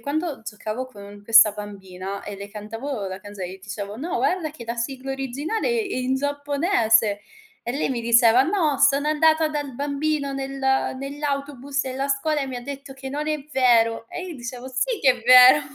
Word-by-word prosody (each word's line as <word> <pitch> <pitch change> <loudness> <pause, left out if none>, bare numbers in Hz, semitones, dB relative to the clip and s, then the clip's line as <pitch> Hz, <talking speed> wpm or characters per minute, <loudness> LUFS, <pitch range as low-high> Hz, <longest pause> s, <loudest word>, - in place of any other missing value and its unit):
quando 290 +1 -3
giocavo 220 +3 -5
con 205 -4 -12
questa 220 0 +7
bambina 195 -2 -7
e 205 - -6
le 200 +1 -8
cantavo 215 +2 -5
la 190 0 -6
canzone, 205 -2 -7
io 190 - -12
dicevo: 205 +1 -6
"No, 320 +9 -3
guarda 355 -4 0
che 290 -6 -11
la 235 - -3
sigla 265 +3 -4
originale 270 - -3
è 455 -5 -1
in 255 +1 0
giapponese" 280 - +1 0.4
e 240 - -4
lei 280 +4 -1
mi 255 -3 -2
diceva: 235 +1 +5
"No, 315 -4 +1
sono 280 +1 +4
andata 315 +1 +3
dal 290 -4 -4
bambino 285 0 -1
nel 270 0 -5 0.4
nell'autobus 280 -1 -3
della 265 +1 -3
scuola 295 +2 0
e 270 - -3
mi 255 - -5
ha 245 - -7
detto 275 0 -8
che 265 0 -8
non 300 +2 -3
è 305 0 0
vero" 230 -3 +3
e - - -6
io 340 - -7
dicevo: 245 0 -7
"Sì 435 - -1
che 270 - +5
è - - -18
vero." 255 +4 +8
265 Hz, 185 wpm, -23 LUFS, 225-290 Hz, 0.4 s, vero